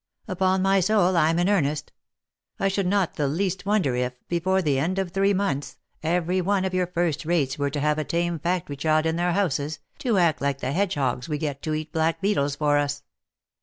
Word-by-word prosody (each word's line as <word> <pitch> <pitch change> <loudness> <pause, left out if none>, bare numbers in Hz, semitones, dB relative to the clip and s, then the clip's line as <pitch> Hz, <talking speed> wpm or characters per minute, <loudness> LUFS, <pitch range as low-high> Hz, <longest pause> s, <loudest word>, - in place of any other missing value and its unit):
Upon 185 -1 +1
my 195 0 +4
soul, 190 -1 +3
I'm 165 0 +3
in 175 +1 +2
earnest; 155 -7 0 0.7
I 195 - +2
should 195 -1 -1
not 195 -2 0
the 145 - +1
least 185 +5 -2
wonder 195 -12 +2
if, 125 0 -1
before 185 +2 +1
the 140 -4 +1
end 175 +7 -1
of 190 -2 -1
three 195 +2 +2
months, 185 -8 -1 0.2
every 175 +3 0
one 190 +1 +1
of 190 - -2
your 185 -1 +1
first 170 -4 -1
rates 150 -5 0
were 145 0 +1
to 145 +1 -3
have 150 +1 +1
a - - 0
tame 170 +2 -1
factory 170 -3 -2
child 155 +2 +2
in 160 0 +1
their 175 +1 +1
houses, 155 -6 0 0.2
to 245 -7 +1
act 170 -4 +2
like 140 -1 0
the 130 - -2
hedgehogs 145 -7 -1
we 150 - -1
get 145 -2 -4
to 155 -1 -2
eat 155 0 -5
black 160 0 +1
beetles 145 -9 0
for 145 0 +2
us. 145 0 -2
170 Hz, 210 wpm, -25 LUFS, 145-190 Hz, 0.7 s, my